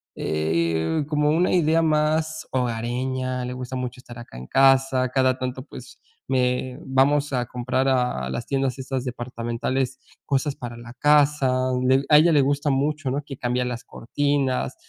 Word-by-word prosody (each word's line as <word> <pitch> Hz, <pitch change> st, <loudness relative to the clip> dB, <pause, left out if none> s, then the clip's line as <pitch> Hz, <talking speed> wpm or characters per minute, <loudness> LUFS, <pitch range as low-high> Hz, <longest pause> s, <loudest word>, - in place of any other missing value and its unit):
eh, 80 Hz, -, 0 dB
como 150 Hz, -1 st, +1 dB
una 170 Hz, +5 st, +2 dB
idea 165 Hz, -1 st, +3 dB
más 155 Hz, 0 st, 0 dB
hogareña. 125 Hz, +1 st, -2 dB
Le 125 Hz, -, -4 dB
gusta 125 Hz, 0 st, -6 dB
mucho 125 Hz, 0 st, -4 dB
estar 120 Hz, -2 st, -12 dB
acá 120 Hz, -, -11 dB
en 65 Hz, -, -9 dB
casa, 135 Hz, -1 st, +3 dB
cada 130 Hz, -1 st, +2 dB
tanto 130 Hz, 0 st, -4 dB
pues 130 Hz, -3 st, -12 dB, 0.3 s
me 125 Hz, 0 st, 0 dB
vamos 140 Hz, +2 st, +2 dB
a 125 Hz, -1 st, 0 dB
comprar 125 Hz, +2 st, -1 dB
a 125 Hz, -, 0 dB
las 120 Hz, -, -4 dB
tiendas 135 Hz, -1 st, -1 dB
esas 130 Hz, -1 st, -4 dB
departamentales 125 Hz, +2 st, -3 dB, 0.3 s
cosas 140 Hz, +1 st, 0 dB
para 120 Hz, -2 st, -7 dB
la 120 Hz, 0 st, -11 dB
casa. 140 Hz, -3 st, +3 dB
A -, -, -1 dB
un 130 Hz, 0 st, +1 dB, 0.2 s
a 150 Hz, -, +8 dB
ella 165 Hz, +2 st, +5 dB
le 145 Hz, -2 st, +5 dB
gusta 145 Hz, +2 st, +1 dB
mucho, 145 Hz, 0 st, -1 dB
¿no?, 140 Hz, -, -1 dB
que 135 Hz, -2 st, -9 dB
cambiar 125 Hz, 0 st, -1 dB
las 125 Hz, -1 st, -5 dB
cortinas, 140 Hz, +1 st, -1 dB
130 Hz, 165 wpm, -23 LUFS, 125-145 Hz, 0.3 s, a